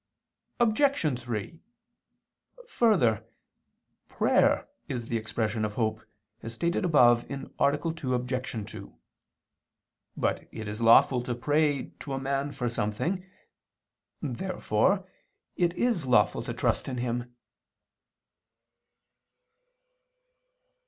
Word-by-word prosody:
Obj. 225 - +2
3: 120 +7 -5 1.1
Further, 175 - +3 0.8
prayer - - +2 0.2
is 120 -3 -4
the 115 - 0
expression 110 0 -2
of 105 -1 -2
hope, 110 -2 -1 0.4
as 115 0 -7
stated 170 +8 0
above 120 -8 +4
(A. 140 - -3
2, 145 -1 0
Obj. 125 -3 -3
2). 100 -2 -10 1.2
But - - -1
it 110 -2 -6
is 105 +2 -5
lawful 115 +2 +6
to 120 0 -3
pray 145 +2 +1
to 140 - -5
a 135 - -1
man 140 +1 -1
for 130 -3 -3
something. 120 - -2 1.0
Therefore 185 - 0 0.5
it 175 0 +1
is 225 - 0
lawful 105 -5 +3
to - - -3
trust - - 0
in 130 - -3
him. 120 0 -3
125 Hz, 100 wpm, -28 LUFS, 115-155 Hz, 1.2 s, lawful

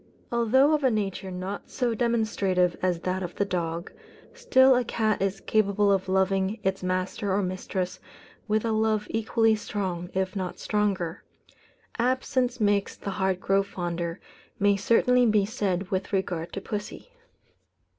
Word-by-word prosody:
Although 250 +5 +4
of 300 -2 +1
a 260 - +5
nature 200 -4 -2
not 185 +2 -6
so 245 -3 -1
demonstrative 215 -6 +1
as 180 -2 0
that 185 +1 -2
of 180 -1 -5
the 200 - 0
dog, 170 -3 -3 0.4
still 270 - +5
a 250 - +2
cat 220 -3 0
is 195 0 -1
capable 205 -1 +2
of 190 -1 0
loving 190 +2 +1
its 190 0 0
master 185 +2 -2
or 200 +1 +1
mistress 185 0 -3 0.5
with 215 +1 +1
a 225 - +1
love 220 -1 +1
equally 225 0 +2
strong, 185 -5 -4
if 190 +1 -1
not 185 -2 -3
stronger. 200 -5 -1 0.8
"Absence 255 0 0
makes 205 -2 +1
the 200 - -5
heart 190 -1 0
grow 195 +1 +2
fonder," 175 -2 -4 0.4
may 205 -1 +3
certainly 240 +4 +3
be 210 -2 +3
said 195 -3 -2
with 190 +2 -2
regard 180 -4 -2
to 195 - -4
pussy. 210 - -6
200 Hz, 150 wpm, -26 LUFS, 185-220 Hz, 0.8 s, a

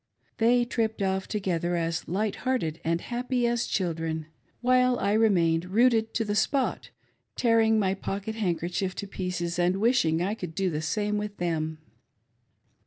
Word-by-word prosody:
They 240 +2 +4
tripped 225 -4 -1
off 190 0 -1
together 175 -4 -1
as 165 -1 -2
light 200 +5 -1
hearted 170 -12 -1
and 165 +1 0
happy 245 0 -1
as 235 0 0
children, 165 -3 -2 0.3
while 250 0 +3
I 200 - 0
remained 175 -7 +3
rooted 225 +3 +2
to 225 - +1
the 205 - -1
spot, 265 +5 0 0.5
tearing 225 -2 +3
my 190 -3 +2
pocket 200 +2 -4
hand 195 -7 0
kerchief 180 +2 -2
to - - -4
pieces, 180 -2 -3
and 180 +2 +2
wishing 215 -9 +3
I 190 +4 0
could 180 -7 -7
do 190 -2 0
the 150 0 -2
same 210 +5 -1
with 210 -1 -5
them. 160 -2 -2
195 Hz, 160 wpm, -27 LUFS, 170-225 Hz, 0.5 s, They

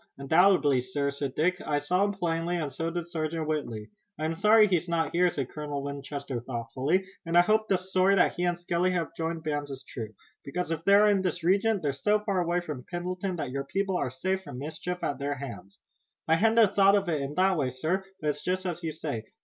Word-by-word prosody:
"Undoubtedly, 150 -2 +4
sir," 140 +3 -2
said 140 -1 -4
Dick. 180 +4 +1
"I 145 - 0
saw 180 +7 +1
him 205 - -1
plainly, 170 -2 -1
and 150 -5 -3
so 165 +5 -2
did 170 0 -3
Sergeant 160 -1 -3
Whitley." 120 -9 -3 0.3
"I'm 155 +1 -1
not 165 - -6
sorry 215 +1 +7
he's 180 -4 +1 0.2
here," 180 +1 +3
said 135 -6 -4
Colonel 145 -2 -5
Winchester 140 -2 -5
thoughtfully, 130 +10 -1 0.2
"and 165 0 +1
I - - +9
hope 215 +4 +2
the 190 - +3
story 185 +1 +2
that 180 - +3
he 175 - -3
and 175 -1 0
Skelly 175 +1 0
have 170 -2 -2
joined 165 0 -3
bands 145 -2 -2
is 135 -1 -7
true, 110 -3 -6 0.3
because 170 +4 -3
if 165 -1 -2
they 200 - +6
are 210 +1 +6
in 200 -2 +3
this 180 -2 -2
region 200 +3 +2
they're 145 -3 0
so 210 +10 +2
far 200 -3 0
away 175 +1 0
from 150 -7 -6
Pendleton 180 +1 -3
that 155 -6 -4
your 140 +1 -3
people 195 +5 -1
are 140 - 0
safe 185 +10 -2
from 145 -9 -9
mischief 160 +6 -4
at 140 - -2
their 145 +1 -2
hands." 120 -8 -9 0.5
"I 160 - +4
hadn't 220 0 +4
thought 195 0 +6
of 200 -2 +1
it 155 -4 0
in 140 +2 -4
that 190 +2 +3
way, 140 -6 0
sir, 160 +10 -1 0.2
but 150 -1 +1
it's 150 0 -9
just 185 +1 -1
as 175 -1 -3
you 160 -2 -3
say. 145 -8 -4
165 Hz, 230 wpm, -28 LUFS, 140-185 Hz, 0.5 s, I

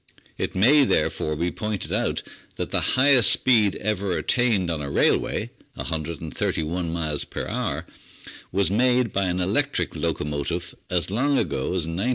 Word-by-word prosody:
It - - -3
may, 135 +10 +6
therefore, 75 - 0
be 85 +3 -1
pointed 105 -3 -4
out - - 0 0.3
that - - -4
the - - +2 0.2
highest 130 -2 +6
speed 110 -6 +4
ever 100 -3 -1
attained 110 -9 +1
on 80 -2 -3
a 70 - -4
railway - - +1 0.2
131 80 +1 -3
miles 80 -3 -2
per - - -6
hour - - -3 0.7
was 95 0 +1
made 125 +1 +2
by 100 0 +1
an 90 0 -1
electric 110 +11 0
locomotive 75 +4 -3 0.2
as 90 -1 -1
long 135 +6 +1
ago 65 - -1
as 90 -4 0
1903. 85 +9 -2
95 Hz, 150 wpm, -24 LUFS, 80-115 Hz, 0.7 s, may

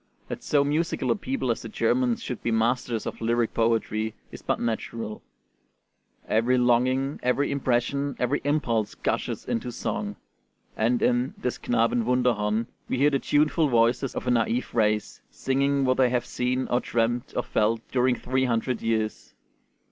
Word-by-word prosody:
That - - -5
so 145 -1 +2
musical 155 +4 0
a - - +3
people 250 - -2
as 115 - -2
the 115 - -7
Germans 120 +2 +1
should 125 - -5
be - - -1
masters 115 0 0
of - - -6
lyric 115 0 +1
poetry 110 -1 0 0.2
is - - -10
but - - -1
natural, 115 -1 -3 1.1
every 120 +4 +2
longing, 130 +3 +2
every 125 +4 +1
impression, 140 +1 0
every 125 +4 0
impulse 125 -7 0
gushes - - -2
into - - -2
song; - - -3 0.6
and 120 +2 +1
in 125 +1 +1
'Des 125 - -2
Knaben 115 0 +1
Wunderhorn' 115 -3 +1 0.2
we - - 0
hear 145 +3 +4
the 140 - +1
tuneful 150 +3 +2
voices 120 +2 +2
of - - -4
a - - +1
naïve 120 +1 0
race, 105 -2 0
singing 140 +1 0
what 130 0 +2
they 130 -2 +4
have 120 -1 0
seen 125 +1 -1
or 120 - +2
dreamed 120 +1 -1
or - - 0
felt 110 +2 +1
during 125 0 +2
three 130 +2 0
hundred 120 0 -1
years. 110 -1 -2
125 Hz, 160 wpm, -26 LUFS, 115-130 Hz, 1.1 s, hear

